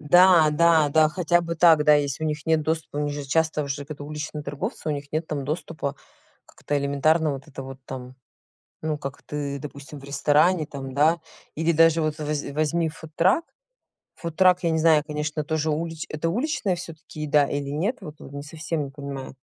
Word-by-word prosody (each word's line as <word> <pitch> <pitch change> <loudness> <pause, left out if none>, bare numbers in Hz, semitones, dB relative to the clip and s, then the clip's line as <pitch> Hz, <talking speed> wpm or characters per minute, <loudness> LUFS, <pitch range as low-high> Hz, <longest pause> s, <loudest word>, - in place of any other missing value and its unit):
Да, 170 +1 +6
да, 160 0 +4
да 155 +1 +5
хотя 175 +1 +2
бы 170 -1 -3
так. 160 -2 +5
Да, 150 - +7
если 145 +1 0
у - - +1
них 150 -1 -3
нет 160 -1 +3
доступа, 160 -1 -2
у - - 0
них 145 - -2
же 145 -1 -5
часто 155 +1 +1
уже 140 0 -4
такие 145 0 -8
уличные 150 0 -5
торговцы, 150 - -5
у - - +1
них 140 -1 -6
нет 160 +1 -1
там 145 -3 -3
доступа 150 -1 -4 0.5
как-то 145 - -4
элементарно 140 +3 +2
вот 135 +2 -8
это 135 -1 -8
вот 135 0 -9
там, 130 -1 -7 0.7
ну, 155 -1 -1
как 140 -1 -7
ты 145 -1 -4
допустим 140 +1 -9
в 140 - -13
ресторане, 150 +4 +2
там, 135 -2 -7
да. 160 +4 +3 0.4
Или 165 +2 +2
даже 165 0 +5
вот 155 -1 -1
возь 150 -1 -2
возьми 155 +3 +1
фудтрак. 165 - +1 0.7
Фудтрак 180 +2 +2
я 170 - +2
не 160 - +1
знаю, 155 -2 +5
конечно, 150 0 -2
тоже 160 +1 -1
улич 160 +1 -3
это 155 +2 -2
уличная 235 - 0
всё-таки 165 -2 -9
еда 150 -1 +3
или 140 -1 -3
нет? 185 - -1
Вот 150 - -8
во - - -11
не 140 +1 -7
совсем 155 +1 -3
не 135 - -9
понимаю. 140 -2 -7
150 Hz, 195 wpm, -25 LUFS, 145-165 Hz, 0.7 s, Да